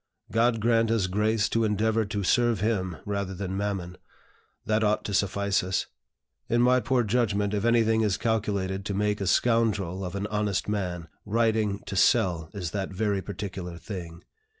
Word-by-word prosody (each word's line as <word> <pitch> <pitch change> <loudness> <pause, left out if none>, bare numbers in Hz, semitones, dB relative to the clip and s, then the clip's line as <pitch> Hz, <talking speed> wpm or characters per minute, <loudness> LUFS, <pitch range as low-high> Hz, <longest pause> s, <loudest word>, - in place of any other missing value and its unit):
God 115 0 +2
grant 115 0 +3
us 115 -4 +2
grace 105 +3 +1
to 115 - +1
endeavor 110 +1 +1
to 100 0 -3
serve 120 +2 +2
Him 95 -6 -1
rather 100 -2 -3
than 95 0 -4
Mammon, 95 -3 -3 0.7
that 110 +1 +1
ought 105 0 +1
to 100 - -3
suffice 100 0 +1
us. 95 +1 -1 0.6
In 120 - +2
my 125 +1 +5
poor 125 +1 +1
judgment, 105 -3 0
if 105 +1 -1
anything 115 -1 +3
is 105 -3 +1
calculated 100 -4 -1
to 100 - -2
make 105 0 0
a 95 - -1
scoundrel 105 -5 +1
of 90 0 -5
an 100 +1 -2
honest 105 -2 -1
man, 90 -5 -3 0.2
writing 110 -2 0
to 100 - -5
sell 85 -3 +2
is 90 -5 -5
that 95 -1 -3
very 100 0 -1
particular 95 -3 -6
thing. 85 -2 -8
105 Hz, 170 wpm, -27 LUFS, 95-110 Hz, 0.7 s, my